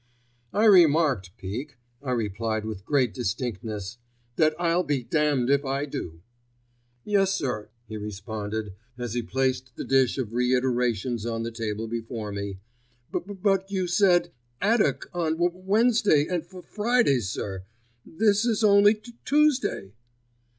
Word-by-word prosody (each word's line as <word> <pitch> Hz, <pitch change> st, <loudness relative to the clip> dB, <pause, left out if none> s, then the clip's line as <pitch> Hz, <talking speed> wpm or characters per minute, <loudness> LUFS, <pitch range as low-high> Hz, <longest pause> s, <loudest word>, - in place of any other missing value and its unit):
"I 210 Hz, +2 st, +2 dB
remarked, 160 Hz, -, +5 dB
Peake," 120 Hz, +9 st, -6 dB, 0.2 s
I 140 Hz, -, -6 dB
replied 110 Hz, -2 st, -1 dB
with 105 Hz, -3 st, -6 dB
great 130 Hz, -6 st, +2 dB
distinctness, 110 Hz, -1 st, -4 dB, 0.4 s
"that 155 Hz, +1 st, +3 dB
I'll 170 Hz, 0 st, +2 dB
be 145 Hz, -7 st, -1 dB
damned 140 Hz, 0 st, +1 dB
if 140 Hz, 0 st, +3 dB
I 135 Hz, +1 st, -1 dB
do." 85 Hz, -, -7 dB, 0.8 s
"Yes, 195 Hz, -2 st, +2 dB
sir," 105 Hz, -5 st, -3 dB, 0.2 s
he 110 Hz, 0 st, -6 dB
responded, 105 Hz, 0 st, -5 dB, 0.2 s
as 120 Hz, -3 st, -4 dB
he 120 Hz, -, 0 dB
placed 130 Hz, 0 st, -2 dB
the -, -, -5 dB
dish 135 Hz, -2 st, +2 dB
of 120 Hz, -4 st, -3 dB
reiterations 125 Hz, -2 st, 0 dB
on 115 Hz, -1 st, -2 dB
the 115 Hz, -, -4 dB
table 115 Hz, -1 st, -4 dB
before 115 Hz, -2 st, -5 dB
me; 100 Hz, -1 st, -5 dB, 0.5 s
"b -, -, 0 dB
b -, -, -14 dB
b 205 Hz, -, -6 dB
but 195 Hz, -1 st, +2 dB
you 190 Hz, -2 st, -1 dB
said 175 Hz, -1 st, +3 dB, 0.3 s
'addock 220 Hz, +2 st, +1 dB
on 165 Hz, -3 st, 0 dB
W 175 Hz, +2 st, +2 dB
w 185 Hz, +2 st, -18 dB
Wednesdays 210 Hz, -8 st, +3 dB
and 175 Hz, -2 st, 0 dB
F 185 Hz, +2 st, -19 dB
f 180 Hz, -, -10 dB
fridays, 210 Hz, -, +1 dB
sir: 95 Hz, -1 st, -4 dB, 0.4 s
this 205 Hz, +4 st, +2 dB
is 230 Hz, -2 st, +1 dB
only 205 Hz, 0 st, +6 dB
T 215 Hz, +3 st, -14 dB
t 235 Hz, -, -28 dB
tuesday." 275 Hz, -, +1 dB
130 Hz, 155 wpm, -26 LUFS, 110-180 Hz, 0.8 s, only